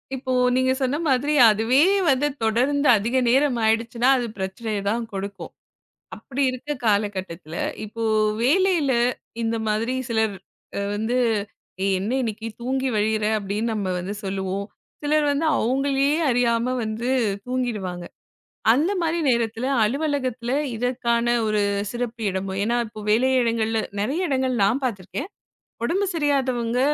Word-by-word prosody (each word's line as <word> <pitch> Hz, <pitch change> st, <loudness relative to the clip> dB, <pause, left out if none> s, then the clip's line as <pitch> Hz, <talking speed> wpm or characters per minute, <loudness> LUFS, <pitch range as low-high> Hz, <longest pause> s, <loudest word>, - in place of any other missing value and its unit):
இப்போ 260 Hz, 0 st, -4 dB, 0.2 s
நீங்க 260 Hz, 0 st, +2 dB
சொன்ன 265 Hz, +3 st, +1 dB
மாதிரி, 280 Hz, +3 st, +2 dB, 0.2 s
அதுவே 225 Hz, +6 st, +3 dB, 0.3 s
வந்து 275 Hz, +2 st, +3 dB, 0.2 s
தொடர்ந்து 265 Hz, +6 st, +2 dB
அதிக 230 Hz, +5 st, -2 dB
நேரம் 265 Hz, 0 st, +3 dB
ஆயிடுச்சுன்னா, 230 Hz, +3 st, +2 dB
அது 245 Hz, -2 st, -2 dB
பிரச்சனைய 200 Hz, +2 st, -3 dB
தான் 230 Hz, +3 st, -1 dB
குடுக்கும். 195 Hz, -2 st, -6 dB, 0.7 s
அப்படி 275 Hz, 0 st, -4 dB
இருக்க 255 Hz, +3 st, -8 dB, 0.2 s
காலகட்டத்துல, 190 Hz, -6 st, -1 dB, 0.3 s
இப்போ 230 Hz, +2 st, -6 dB, 0.4 s
வேலையில 330 Hz, 0 st, +3 dB, 0.5 s
இந்த 230 Hz, 0 st, 0 dB
மாதிரி 225 Hz, +4 st, 0 dB
சிலர் 220 Hz, -3 st, +1 dB, 0.6 s
வந்து, 220 Hz, +4 st, -1 dB, 0.7 s
ஏய்! 195 Hz, -, +2 dB
என்ன 210 Hz, +6 st, -2 dB
இன்னைக்கு 225 Hz, -1 st, -4 dB, 0.2 s
தூங்கி 265 Hz, +1 st, -1 dB
வழியறே 215 Hz, 0 st, +1 dB
அப்படின்னு 210 Hz, +3 st, -2 dB
நம்ம 200 Hz, -3 st, -2 dB
வந்து 185 Hz, +3 st, -4 dB
சொல்லுவோம். 195 Hz, +1 st, -3 dB, 0.4 s
சிலர் 300 Hz, 0 st, +2 dB
வந்து 305 Hz, +3 st, 0 dB
அவங்களே 275 Hz, +3 st, +1 dB, 0.2 s
அறியாம 240 Hz, 0 st, +1 dB
வந்து 225 Hz, +4 st, -3 dB, 0.4 s
தூங்கிடுவாங்க. 215 Hz, -9 st, -3 dB, 0.7 s
அந்த 310 Hz, +9 st, +1 dB
மாரி 335 Hz, 0 st, 0 dB
நேரத்துல 235 Hz, 0 st, 0 dB, 0.2 s
அலுவலகத்துல 255 Hz, -2 st, -1 dB, 0.2 s
இதற்கான 235 Hz, 0 st, 0 dB, 0.2 s
ஒரு 210 Hz, -1 st, +1 dB, 0.3 s
சிறப்பு 240 Hz, -1 st, -4 dB
இடமும், 190 Hz, +1 st, -3 dB
என்னா 235 Hz, +3 st, +1 dB
இப்போ 215 Hz, 0 st, -11 dB
வேலையிடங்கள்ல 230 Hz, -2 st, +2 dB, 0.2 s
நெறைய 295 Hz, -, -1 dB
இடங்கள்ல 260 Hz, -2 st, 0 dB
நான் 245 Hz, +8 st, +1 dB
பாத்துருக்கன். 245 Hz, -, -4 dB, 0.5 s
உடம்பு 385 Hz, +11 st, +1 dB
சரியாதவங்க 260 Hz, -6 st, 0 dB
235 Hz, 125 wpm, -23 LUFS, 215-265 Hz, 0.7 s, அதுவே